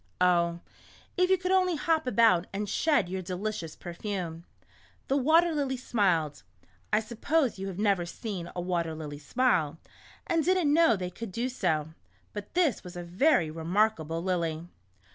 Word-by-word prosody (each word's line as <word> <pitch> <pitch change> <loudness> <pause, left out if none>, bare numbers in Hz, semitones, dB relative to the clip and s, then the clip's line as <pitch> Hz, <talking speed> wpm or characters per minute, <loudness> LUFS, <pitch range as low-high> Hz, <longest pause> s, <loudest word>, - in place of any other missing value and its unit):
Oh, 170 -1 +2 0.5
if 365 0 +2
you 380 - +5
could 365 +1 -2
only 370 -2 +3
hop 315 -1 0
about 225 -8 +4
and 205 +1 -3
shed 225 - +2
your 190 +1 -3
delicious 185 -2 -4
per 175 - -8
fume." 170 -4 -5 0.6
The 270 - +2
Water 320 +5 +4
Lily 275 -3 -1
smiled 180 - 0 0.5
(I - - +4
suppose 235 +2 0
you 195 - -4
have 190 -2 -6
never 200 -4 +1
seen 180 -1 -5
a 175 - -2
water 170 -3 -1
lily 150 -2 -7
smile, 165 - +1 0.5
and 330 -1 +1
did 370 +3 +3
n't 300 -5 +2
know 330 -6 +5
they 180 -2 -4
could 220 +3 -7
do 235 +6 -2
so, 160 - -1 0.4
but 205 +6 -8
this 335 - +2
was 180 0 -10
a 175 - -5
very 175 - +2
re 160 +1 -7
markable 170 -3 +1
lily). 170 -3 -1
195 Hz, 170 wpm, -28 LUFS, 170-265 Hz, 0.6 s, you